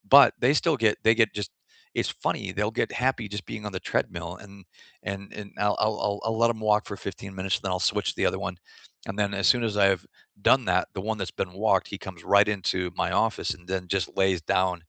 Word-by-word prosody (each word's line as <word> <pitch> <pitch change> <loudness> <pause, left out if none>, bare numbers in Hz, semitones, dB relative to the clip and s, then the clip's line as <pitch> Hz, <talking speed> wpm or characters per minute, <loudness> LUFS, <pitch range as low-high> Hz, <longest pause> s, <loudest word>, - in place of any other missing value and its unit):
but, 140 -3 +9
they 135 +4 +5
still 160 -5 +2
get 105 - +5
they 110 +1 +6
get, 110 - +2
just 90 - -5 0.5
it's - - 0 0.2
funny, - - 0
they'll 105 +2 0
get - - -1
happy 130 -4 +1
just 105 - -5
being 105 -1 -6
on 105 - -5
the - - -2
treadmill, 85 0 -1
and 100 -1 -14 0.6
and 100 0 -4 0.2
and 100 - -7 0.2
I'll 105 - +2
I'll 110 0 +1
I'll 100 0 -1
I'll 110 0 0
let 115 - +5
'em 110 - -11
walk 105 0 +3
for 100 - -6
15 95 0 -6
minutes, 95 +1 0
then 95 -2 -3
I'll 90 - -1
switch - - -1
to - - -16
the - - +2
other - - -4
one, - - -3 0.5
and 95 - -4
then, 100 -1 +1
as - - +3
soon 120 -2 -1
as 105 - -5
I've 95 -2 +3 0.4
done - - +5
that, - - +2
the 95 - -3
one 110 - 0
that's 95 - -4
been 90 -1 -3
walked, 95 -4 +3
he - - -2
comes 90 -3 -9
right 100 0 +7
into 95 -1 -1 0.2
my - - +1
office - - -1
and 90 - -19
then 95 -1 -1
just 95 - 0
lays 95 -2 +3 0.2
down 90 -1 +2
100 Hz, 245 wpm, -26 LUFS, 95-105 Hz, 0.6 s, but